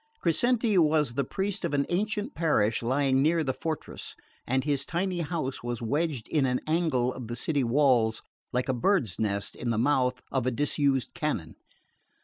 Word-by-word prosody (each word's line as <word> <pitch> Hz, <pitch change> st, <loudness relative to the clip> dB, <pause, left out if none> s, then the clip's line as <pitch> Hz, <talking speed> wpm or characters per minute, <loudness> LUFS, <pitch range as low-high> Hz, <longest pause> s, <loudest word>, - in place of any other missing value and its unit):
Crescenti 220 Hz, +4 st, +2 dB
was 150 Hz, -5 st, +3 dB
the 140 Hz, +3 st, 0 dB
priest 190 Hz, +8 st, -3 dB
of 145 Hz, -, 0 dB
an 140 Hz, 0 st, +2 dB
ancient 210 Hz, +3 st, -1 dB
parish 130 Hz, -10 st, +1 dB
lying 135 Hz, +2 st, +2 dB
near 160 Hz, +3 st, +3 dB
the 130 Hz, -3 st, -1 dB
fortress; 160 Hz, +1 st, -5 dB, 0.3 s
and 130 Hz, +1 st, +1 dB
his 140 Hz, -1 st, 0 dB
tiny 180 Hz, +3 st, -2 dB
house 155 Hz, -5 st, -3 dB
was 120 Hz, -1 st, -3 dB
wedged 145 Hz, +1 st, -1 dB
in 145 Hz, -4 st, +1 dB
an 125 Hz, 0 st, 0 dB
angle 155 Hz, -6 st, +1 dB
of 125 Hz, -3 st, -7 dB
the 120 Hz, -, -4 dB
city 140 Hz, +3 st, 0 dB
walls, 120 Hz, -3 st, +2 dB, 0.3 s
like 125 Hz, 0 st, -1 dB
a 130 Hz, -, +1 dB
bird's 125 Hz, -, +1 dB
nest 100 Hz, -2 st, -1 dB
in 120 Hz, -, -4 dB
the 115 Hz, -, 0 dB
mouth 125 Hz, 0 st, +2 dB
of 130 Hz, -2 st, 0 dB
a -, -, +5 dB
disused 140 Hz, 0 st, 0 dB
canon. 100 Hz, -, -3 dB
140 Hz, 175 wpm, -28 LUFS, 125-160 Hz, 0.3 s, a